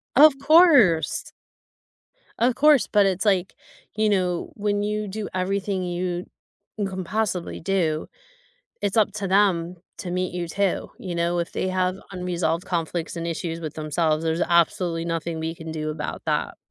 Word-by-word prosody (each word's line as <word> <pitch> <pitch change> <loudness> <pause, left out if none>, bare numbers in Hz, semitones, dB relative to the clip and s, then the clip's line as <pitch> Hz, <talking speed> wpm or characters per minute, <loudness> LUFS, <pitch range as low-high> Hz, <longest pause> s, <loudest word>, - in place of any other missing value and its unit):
Of 290 0 +7
course. 280 - +5 1.1
Of 240 +1 +3
course, 295 -1 +5
but 205 -2 +4
it's 190 +1 0
like, 190 -3 +1 0.4
you 215 0 +2
know, 180 -3 0
when 205 0 -1
you 210 0 -2
do 205 +2 -5
everything 190 +1 -1
you 175 0 -3 0.5
can 190 -3 -3
possibly 190 -2 -2
do, 165 -4 0 0.8
it's 205 0 -1
up 215 -2 +3
to 205 -2 -3
them 185 -3 +2 0.2
to 180 - -5
meet 180 0 -2
you 175 -1 -3
too. 195 +2 -1
You 180 -3 -5
know, 170 +1 0
if 170 0 -2
they 185 - -1
have 185 0 0 0.2
unresolved 180 -1 -2
conflicts 170 -1 -3
and 170 0 -3
issues 165 0 -3
with 155 -3 -6
themselves, 155 0 0
there's 165 +1 0
absolutely 170 0 +1
nothing 165 -1 -3
we 160 +1 -3
can 160 -1 -8
do 155 -1 -3
about 155 - -5
that. - - -1
180 Hz, 160 wpm, -24 LUFS, 170-205 Hz, 1.1 s, Of